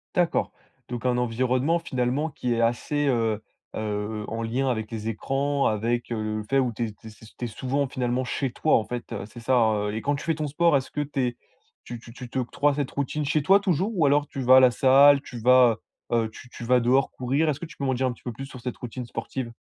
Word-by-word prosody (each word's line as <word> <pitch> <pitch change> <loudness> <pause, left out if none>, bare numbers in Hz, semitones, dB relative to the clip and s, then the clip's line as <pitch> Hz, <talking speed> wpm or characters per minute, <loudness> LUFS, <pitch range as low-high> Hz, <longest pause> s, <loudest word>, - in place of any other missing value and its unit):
D'accord, 175 -2 +1 0.4
donc 120 0 -5
un 125 -1 +2
environnement 130 +6 +1
finalement 130 0 -1
qui 125 -4 -2
est 115 - 0
assez 145 +5 0
heu 115 -4 +1 0.3
heu 105 0 -3
en 115 +1 -4
lien 125 +4 -1
avec 110 -3 -2
les 110 -1 -4
écrans, 135 +5 0
avec, 115 +3 -1
heu, - - 0 0.2
le - - -5
fait 135 +6 0
où 130 -3 +2
tu 120 - -1
es - - -7
tu 110 - -15
es - - -7
s 110 +1 -16
tu 125 - -3
es - - -2
souvent 130 +5 -2
finalement 125 -1 -1
chez 130 +1 -2
toi, 155 - +2
en 110 - -1
fait, 120 0 -6
heu, - - -4
c'est 120 - -12
ça, 130 +2 +2 0.3
heu? - - -4
Et 110 - -3
quand 145 +4 0
tu 140 - -6
fais 165 - +1
ton 150 0 -3
sport, 165 +2 +3
est-ce 130 - -5
que 150 - -2
tu 145 -1 -4
es 120 -1 -1 0.5
tu 120 - -7
tu 115 - -13
tu 125 0 -9
t'octroies 130 +3 0
cette 140 -2 -2
routine 145 +2 -2
chez 145 +1 +1
toi 195 +6 +6
toujours? 195 +1 0
Ou 165 -5 +3
alors 145 +1 +3
tu 135 - -6
vas 130 +1 +6
à - - +10
la 130 -1 +6
salle, 140 +3 +6
tu 130 -3 -9
vas, 125 -1 +5 0.3
heu - - +2
heu, 110 - -3
tu 125 +2 -13
tu 120 - -9
vas 125 +2 +4
dehors 130 +3 +2
courir? 135 +5 0
Est-ce 145 - -1
que - - -5
tu 170 - -14
peux - - -5
m'en 130 - +1
dire 130 +1 0
un 125 - -2
petit - - -20
peu 120 - -4
plus 135 +5 -7
sur 130 -2 -11
cette 125 0 -5
routine 125 +1 -6
sportive? 115 +1 -5
125 Hz, 260 wpm, -25 LUFS, 120-140 Hz, 0.5 s, à